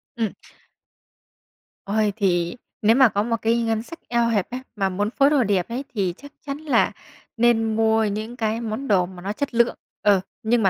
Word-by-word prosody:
Ừm. 225 -3 -2 1.5
Ôi, 210 0 +1
thì 175 -3 +1 0.3
nếu 220 +2 +5
mà 260 -3 +6
có 205 +1 0
một 230 0 0
cái 230 +1 +2
ngân 225 -1 0
sách 335 +7 -11
eo 235 -1 +2
hẹp 205 -5 0
ấy, 250 - -3 0.2
mà 195 -2 0
muốn 205 +3 -1
phối 275 +3 +3
đồ 285 -5 +3
đẹp 195 -3 0
ấy 245 +4 -3
thì 190 -5 0
chắc 285 +1 -13
chắn 280 0 -4
là 305 -2 +2 0.5
nên 225 -2 +3
mua 220 0 +3
những 215 +3 -3
cái 225 -1 -1
món 230 +5 -4
đồ 185 -5 +3
mà 180 -1 -11
nó 200 +2 -3
chất 285 +3 -3
lượng, 235 0 +3 0.3
ừ, 205 -2 +4 0.2
nhưng 230 +1 +2
mà 190 - +5
225 Hz, 200 wpm, -23 LUFS, 205-240 Hz, 1.5 s, mà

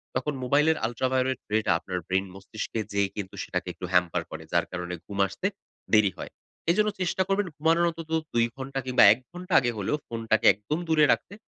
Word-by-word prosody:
তখন 150 - -1
মোবাইলের 150 +5 +3
ultraviolet 130 +2 0
ray 110 - +3
টা - - +2
আপনার 90 +1 -5
ব্রেইন 95 +1 +1
মস্তিষ্কে 110 +3 -5
যেয়ে 100 -1 +1
কিন্তু 100 -2 -6
সেটাকে 90 0 -3
একটু 85 - -7
hamper 90 -1 +2
করে। - - -7
যার - - +3
কারণে 90 -1 -4
ঘুম 100 -1 -7
আসতে 100 - -3 0.5
দেরি 105 -3 +5
হয়। - - -7 0.4
এজন্য 210 +4 +2
চেষ্টা 185 +1 +1
করবেন 195 0 +1
ঘুমানোর 165 +3 +3
অন্তত 165 -1 -8 0.2
2 115 0 +3
ঘন্টা 135 0 -4
কিংবা 125 -1 +4
১ - - -8
ঘটা 180 +1 -6
আগে 120 -2 0
হলেও 105 +9 -1
ফোনটাকে 115 -1 0
একদম 105 +11 -4
দূরে 155 -2 +5
রাখতে. - - -6
125 Hz, 190 wpm, -27 LUFS, 100-160 Hz, 0.5 s, দেরি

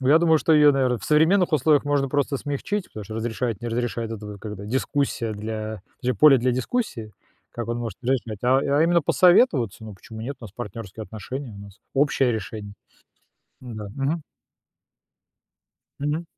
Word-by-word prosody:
Ну, 130 - 0
я 155 +3 +7
думаю, 160 -2 +4
что 160 - +2
её, 150 -1 +7
наверное, 130 -3 +1
в - - -10
современных 160 +4 +3
условиях 150 0 +3
можно 145 -2 +1
просто 140 0 0
смягчить, 165 +9 -3
потому 105 - -8
что 110 +2 -8
"разрешает, 115 -1 -2
не 120 - -3
разрешает"- 115 -1 -2
это 105 -1 -7
когда 105 -1 -7
дискуссия 130 -1 -1
для 110 0 -5 0.2
джа 125 -1 +1
поле 135 +3 +7
для 125 +1 +1
дискуссии, 130 - -2 0.4
как 120 -1 -6
он 120 0 -2
может 115 -5 -5
не 125 - -1
разрешать, 115 -6 -2
а 130 +2 +5 0.2
а - - +5
именно 170 -1 +3
посоветоваться. 145 - +3
Ну, 105 -2 -8
почему 110 +4 -11
нет, 135 +5 -5
у - - -9
нас 100 - -10
партнёрские 110 -2 -7
отношения, 120 +4 -7
у 100 - -11
нас 100 -1 -13
общее 135 -3 +2
решение. 105 -1 -5 0.9
Н-да, 110 -5 -7
мгм. 145 +4 -1 1.8
Мгм. 150 +4 -1
125 Hz, 175 wpm, -24 LUFS, 110-145 Hz, 1.8 s, я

